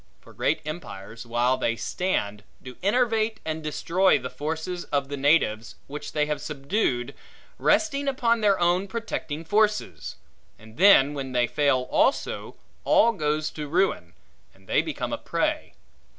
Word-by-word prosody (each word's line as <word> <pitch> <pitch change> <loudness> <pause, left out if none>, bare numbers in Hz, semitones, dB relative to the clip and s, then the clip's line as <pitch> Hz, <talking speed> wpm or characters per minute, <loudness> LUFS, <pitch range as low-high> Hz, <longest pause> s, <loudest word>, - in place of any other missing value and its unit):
For - - -17
great - - 0
empires, 115 - -8
while 120 +2 +1
they 115 - 0
stand, 105 - -2 0.2
do 130 -1 -9
enervate 220 +1 +1
and 160 0 -3
destroy 175 +5 +2
the 125 -2 -6
forces 160 +6 -4
of 140 -1 -1
the 145 - -3
natives 135 -6 +1
which 150 +2 -7
they 150 -1 +1
have 150 -2 -3
subdued, 140 - -1 0.5
resting 285 -3 +2
upon 235 -4 +1
their 200 -2 +3
own 175 +3 +2
protecting 190 -7 -5
forces; 210 +3 0 0.4
and 110 0 -16
then 160 -7 +6
when 135 -2 -5
they 125 -1 +3
fail 140 0 +1
also, 275 - 0 0.3
all 235 - +4
goes 155 -3 -1
to 150 -1 -6
ruin, 150 - 0 0.4
and - - -24
they - - +3
become - - -4
a - - -3
prey. - - -2
155 Hz, 150 wpm, -25 LUFS, 130-195 Hz, 0.5 s, then